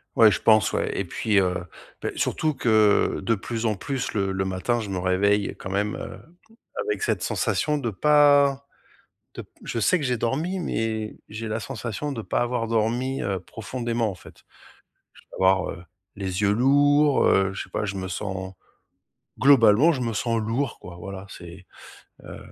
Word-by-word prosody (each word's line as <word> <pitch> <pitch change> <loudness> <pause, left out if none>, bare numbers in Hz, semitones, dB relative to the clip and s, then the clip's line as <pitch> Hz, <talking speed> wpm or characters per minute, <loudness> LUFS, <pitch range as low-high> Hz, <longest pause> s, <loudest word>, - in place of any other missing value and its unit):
Ouais, 110 -2 +7
je - - -2
pense, 110 -4 +4
ouais - - -1
et 95 - -1
puis, 105 +3 +1
heu, 90 -2 -1 0.4
beh, - - -2
surtout 155 -1 0
que 110 -3 +3
de 115 - +1
plus 115 +3 -4
en 105 - 0
plus, 135 +5 -4
le 100 -2 0
le 95 0 -1
matin, 95 +6 -1
je 110 -3 -5
me 95 - -3
réveille 100 +3 +1
quand 95 - -7
même, 100 +2 -1
heu, - - -7 0.7
avec 430 0 -2
cette 430 - -1
sensation 150 -1 0
de 120 -4 -2
pas 140 +3 +4 0.7
de - - -6
p - - -21 0.2
je - - -3
sais 175 - +3
que - - -3
j'ai 125 -3 0
dormi 155 +12 -1
mais 110 -9 -3
j'ai 110 +2 -6
la 110 +2 -2
sensation 115 +7 -5
de 115 - -4
pas - - -1
avoir 120 -1 -1
dormi, 120 +4 0
heu, 95 -2 -2
profondément, 115 +2 -3
en - - -7
fait. 90 - -16 0.8
Je - - -15
vais - - -19
avoir, 95 -1 +2
heu, 85 - -10 0.3
les 95 0 -3
yeux 100 - +3
lourds, 145 +4 +4
heu, 95 0 +3
je - - -5
sais - - -18
pas, - - -2
je 100 -1 -4
me 95 -1 -4
sens 95 0 -5 0.8
globalement, 135 +2 +6
je 130 - -3
me 115 -2 -2
sens 115 +2 0
lourd, 115 +3 -2
quoi, 90 -1 -10
voilà. 95 +2 -8
C'est 90 0 -11 0.6
heu - - -9
110 Hz, 185 wpm, -24 LUFS, 95-130 Hz, 0.8 s, Ouais